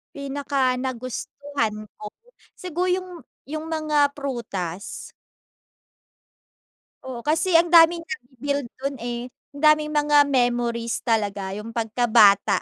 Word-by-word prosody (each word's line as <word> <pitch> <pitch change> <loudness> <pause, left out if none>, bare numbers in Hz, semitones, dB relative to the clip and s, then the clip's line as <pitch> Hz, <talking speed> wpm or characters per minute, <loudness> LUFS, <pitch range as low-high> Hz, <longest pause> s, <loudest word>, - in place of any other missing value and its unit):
Pinaka-nagustuhan 260 -3 -3
ko? 210 - -7 0.5
Siguro 360 0 -3
yung 370 0 -1 0.3
yung 310 +3 -6
mga 310 -2 +2
prutas. 215 - -4 2.2
Oo, 260 -2 -6
kasi 325 +3 +3
ang 340 +1 +3
daming 335 0 +7
na-build 280 -4 -4
dun 275 +1 -3
eh. 240 +1 -4 0.3
Ang 285 - -9
daming 305 0 +4
mga 295 0 +3
memories 240 -3 0
talaga, 205 -4 -1
yung 210 +2 -7
pagkabata. 225 -3 +4
265 Hz, 100 wpm, -23 LUFS, 235-300 Hz, 2.2 s, daming